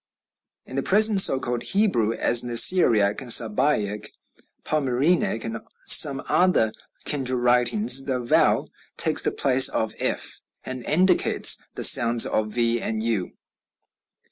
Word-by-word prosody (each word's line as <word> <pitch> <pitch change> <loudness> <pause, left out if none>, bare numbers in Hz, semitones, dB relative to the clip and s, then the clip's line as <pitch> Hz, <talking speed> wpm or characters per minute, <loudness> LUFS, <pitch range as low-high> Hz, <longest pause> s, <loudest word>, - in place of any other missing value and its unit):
"In 130 - -13
the - - -2
present 210 +4 +3
so 135 - +3
called 120 -2 -6
Hebrew, 190 - -2
as 120 +1 +1
in 120 - -9
the 120 - -4
Syriac, 115 - +3
Sabæic, 110 -3 0 0.6
Palmyrenic, 140 -2 -3
and 115 0 -8 0.3
some 140 -3 +4
other 180 -12 -1 0.3
kindred 130 -4 -1
writings, 125 - +1
the 130 -2 -4
vau 120 - -1 0.3
takes - - +2
the - - -2
place 130 -1 +2
of 110 0 -5
F, - - -4 0.3
and 130 -1 -9
indicates 185 +5 +2
the - - -7
sounds 115 -1 +5
of 110 0 -4
v 120 0 -3
and 110 0 -6
u. 110 -6 -5
125 Hz, 135 wpm, -21 LUFS, 115-150 Hz, 0.6 s, sounds